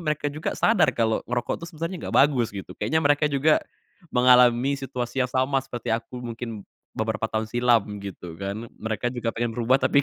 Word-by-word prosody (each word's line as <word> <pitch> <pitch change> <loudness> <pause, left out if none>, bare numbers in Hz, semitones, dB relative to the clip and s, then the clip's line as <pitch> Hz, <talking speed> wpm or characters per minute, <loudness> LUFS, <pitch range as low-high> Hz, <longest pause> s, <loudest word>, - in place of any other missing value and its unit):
mereka 150 -3 -1
juga 150 +2 -3
sadar 220 -6 +4
kalo 110 -1 0
ngerokok 120 -1 -1
tuh - - -5
sebenernya 165 +3 -5
gak - - 0
bagus 125 -6 -1
gitu, 100 -2 -8
kayaknya 160 - 0
mereka 145 0 +2
juga, 145 +3 +3 0.5
mengalami 125 +1 +5
situasi 125 -1 -4
yang 125 - +1
sama 130 +1 +1
seperti 125 -3 -6
aku 115 +2 -5
mungkin, 115 -3 -6 0.3
beberapa 110 0 -1
tahun 110 0 -1
silam 120 -1 +3 0.2
gitu 90 -4 -8
kan, 100 +4 -4
mereka 110 +2 -2
juga 120 -2 -1
pengen 115 0 -2
berubah 120 +3 +3
tapi 140 +1 +3
125 Hz, 180 wpm, -25 LUFS, 115-140 Hz, 0.5 s, mengalami